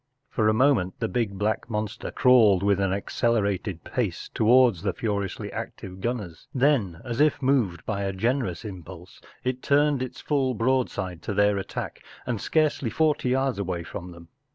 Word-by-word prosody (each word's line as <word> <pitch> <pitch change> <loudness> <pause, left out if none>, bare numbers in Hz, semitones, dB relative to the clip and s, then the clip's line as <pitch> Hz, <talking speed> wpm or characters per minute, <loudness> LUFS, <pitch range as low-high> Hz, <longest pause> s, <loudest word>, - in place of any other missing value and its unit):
For 110 -2 +2
a - - +3
moment 115 -8 +2
the 115 - 0
big 110 -5 -2
black 105 +3 -1
monster 110 0 -3
crawled 110 -7 +5
with 100 -1 +3
an 95 -1 +1
accelerated 100 -3 -1
pace - - -3
towards 120 -4 +4
the 95 -2 -1
furiously 100 -4 -3
active 95 0 -7
gunners. 105 -9 -4
Then, 125 - +1
as 120 +2 -1
if 150 -1 +3
moved 120 - +1
by 100 -2 -2
a 100 -1 -1
generous 115 0 -1
impulse, 90 -2 -10 0.2
it 130 0 -2
turned 145 -1 +3
its 130 - -5
full 135 -4 0
broad¬ 130 +3 +1
side 90 -4 -5
to 100 - -4
their 105 0 +3
attack, 95 - -6 0.2
and 120 -5 -2
scarcely 155 -6 +1
forty 150 -2 +1
yards 130 -3 +1
away 90 -3 -2
from 90 +1 -7
them. 85 -1 -13
110 Hz, 170 wpm, -26 LUFS, 95-130 Hz, 0.2 s, crawled